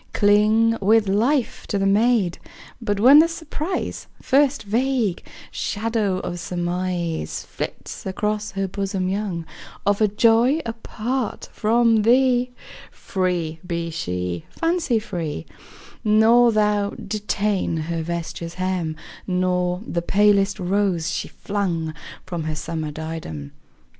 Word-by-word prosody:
Cling 215 +2 +4
with 215 +1 +4
life 235 +7 +1
to 205 - -1
the 195 - +1
maid; 205 -2 +2 0.4
But 205 -3 -1
when 265 +7 +8
the 325 - +6
surprise, 330 +1 -4
First 280 +1 +2
vague 230 -2 0 0.3
shadow 215 -3 -1
of 175 - -4
surmise 175 - -2
Flits - - -6
across 210 +2 -1
her 195 0 -1
bosom 190 -1 -2
young, 190 -4 -2 0.4
Of 205 +1 +2
a 215 - +5
joy 230 +7 +4
apart 230 +1 -3
from 225 0 +3
thee, 250 +2 +4 0.4
Free 175 -4 -2
be 170 -2 -3
she, 90 - -3
fancy 330 -7 0
free; 170 - -4 0.6
Nor 225 +3 +5
thou 210 -1 +1
detain 205 -3 -1
her 165 +1 -2
vesture's 170 0 -5
hem, 185 -4 -1 0.3
Nor 180 0 0
the 170 - -2
palest 200 +2 +3
rose 180 -3 0
she - - -3
flung 175 -6 -2 0.3
From 175 -4 -4
her 155 0 -2
summer 155 0 -4
diadem. 150 - -6
200 Hz, 120 wpm, -22 LUFS, 175-225 Hz, 0.6 s, when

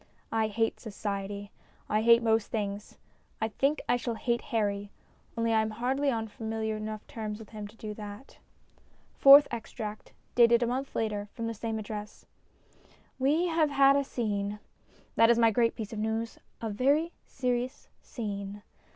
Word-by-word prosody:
I 225 -1 +2
hate 225 +1 -1
Society; 200 -1 -5 0.4
I 215 +1 +1
hate 235 +1 +6
most 225 -2 +2
things. 205 -1 -4 0.4
I 220 - 0
think 275 +7 0
I 245 - +3
shall 240 -1 -3
hate 235 +1 0
Harry, 205 -3 -1 0.5
only 230 0 +1
I 220 - +4
am 220 - -1
hardly 260 +6 0
on 225 -3 -1
familiar 220 0 -3
enough 215 0 -5
terms 215 -2 -5
with 220 -2 -12
him 210 -2 -7
to 210 - -16
do 215 -1 -6
that. 210 +4 -10 0.7
FOURTH 280 +1 +9
EXTRACT 220 -2 -6 0.2
(Dated 235 0 +5
a - - +2
Month 260 +3 -3
later> 210 -2 -2
from 230 -2 -4
the 230 - -2
same 225 +1 -3
Address) 210 -1 -7 0.9
WE 295 +7 +3
have 320 -2 +2
had 275 -1 +5
a 280 - +2
scene. 210 -5 -2 0.6
That 230 0 +6
is 235 - +5
my 230 -1 +5
great 230 +1 +2
piece 215 -1 -6
of 215 - -4
news: 220 +1 -2 0.2
a 225 -2 -2
very 285 +10 +2 0.2
serious 250 +1 -2
scene. 205 -4 -6
225 Hz, 165 wpm, -29 LUFS, 210-240 Hz, 0.9 s, FOURTH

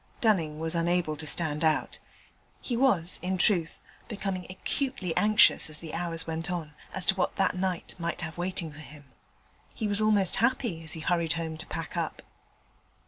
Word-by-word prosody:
Dunning 170 -10 +2
was 160 0 -1
unable 170 -2 +1
to 155 +1 -5
stand 155 -2 0
out: 155 -1 +1 0.6
he 245 - -3
was, 205 -9 +3
in 185 +1 -1
truth, 175 -3 +3 0.2
becoming 195 -4 -4
acutely 190 - -2
anxious, 210 -5 +5
as 150 -1 -2
the 160 -2 -8
hours 165 -1 -2
went 165 0 -3
on, 165 -4 -4 0.2
as 190 -1 0
to - - +7
what 185 - 0
that 195 - +1
night 185 -1 -2
might 170 +1 -3
have 160 -1 -5
waiting 175 -2 -3
for 145 - -13
him. 145 -2 -13 0.6
He 215 - -2
was 205 +1 +1
almost 210 -4 +3
happy 235 -8 0
as 160 - -5
he 160 - -7
hurried 170 -1 +1
home 165 -1 -3
to 155 - -9
pack - - -5
up. - - -3
175 Hz, 180 wpm, -28 LUFS, 160-195 Hz, 0.6 s, to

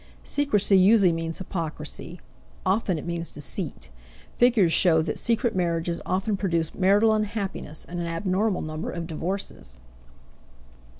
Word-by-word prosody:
Secrecy 210 -9 +3
usually 195 -1 +6
means 165 0 -3
hypocrisy; 170 -1 -5 0.5
often 190 -2 +1
it 150 - -6
means 170 -1 -3
deceit. 140 - -5 0.5
Figures 230 -9 +4
show 160 -3 +5
that 155 - -3
secret 235 -1 0
marriages 170 -1 -1
often 195 +3 0
produce 170 -5 -1
marital 205 +4 +4
unhappiness 205 -7 -3
and 175 0 -6
an 170 - -2
abnormal 185 +4 0
number 155 +1 -4
of 170 -1 -4
divorces. 160 - -4
180 Hz, 125 wpm, -25 LUFS, 165-205 Hz, 0.5 s, usually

